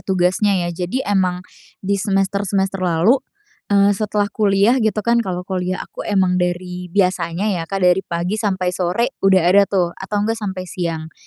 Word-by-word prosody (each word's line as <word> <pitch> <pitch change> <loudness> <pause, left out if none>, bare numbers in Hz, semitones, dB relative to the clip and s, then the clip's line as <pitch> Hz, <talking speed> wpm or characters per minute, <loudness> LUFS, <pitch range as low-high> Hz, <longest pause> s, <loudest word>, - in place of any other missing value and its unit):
tugasnya 190 +1 +1
ya. 175 - -2
Jadi 180 +10 -3
emang 185 -3 0 0.4
di 200 0 0
semester-semester 195 -1 0
lalu, 185 +9 +3 0.5
eee, 200 0 +4
setelah 205 0 -1
kuliah 210 +4 +3
gitu 220 -2 0
kan. 235 0 +3
Kalau 180 -4 -4
kuliah 185 -1 -3
aku - - -11
emang 185 -3 +1
dari 180 0 -3
biasanya 180 -1 0 0.2
ya, 165 - -6
Kak, 195 -1 -1
dari 180 +1 +4
pagi 180 +3 -3
sampai 185 -4 -1
sore 185 +8 -1
udah 190 -2 +4
ada 200 0 +5
tuh, 180 -3 0
atau 195 +4 -5
nggak 225 +1 -2
sampai 190 -3 -4
siang, 165 -3 -4
190 Hz, 165 wpm, -19 LUFS, 180-205 Hz, 0.5 s, ada